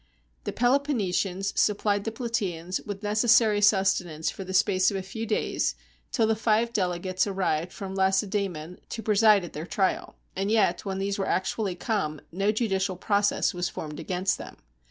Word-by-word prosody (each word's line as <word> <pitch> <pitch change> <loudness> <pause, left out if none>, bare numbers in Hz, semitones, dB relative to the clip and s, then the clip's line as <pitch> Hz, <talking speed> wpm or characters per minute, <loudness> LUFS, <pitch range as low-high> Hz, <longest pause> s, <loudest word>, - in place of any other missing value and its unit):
The - - -2
Peloponnesians 210 -8 0
supplied 205 -1 +1
the 225 - -1
Plataeans 195 -7 -3
with 205 0 -6
neces 215 +3 +1
sary 220 -2 +5
sustenance 190 -6 +2
for 195 - -7
the 190 - -7
space 190 0 +3
of 200 - -3
a 190 - -4
few 220 +4 -5
days, 215 - 0 0.4
till 225 - +2
the 220 0 +2
five 225 +1 +1
delegates 185 0 0
arrived 180 -4 -1
from 195 -1 -7
Lacedaemon 190 -3 0
to 225 - -5
preside 210 -2 +5
at 170 - -10
their 155 +3 -6
trial. 190 -1 -1 0.2
And 195 +2 -1
yet, 210 -5 +2
when 190 -1 -3
these 195 +1 -2
were 195 - -1
actually 190 +1 -1
come, 175 -6 -2
no 195 +4 +1
judicial 195 -4 0
process 205 +2 +1
was 175 0 -2
formed 150 0 -7
against 180 +3 -1
them. - - -9
195 Hz, 170 wpm, -27 LUFS, 185-215 Hz, 0.4 s, sary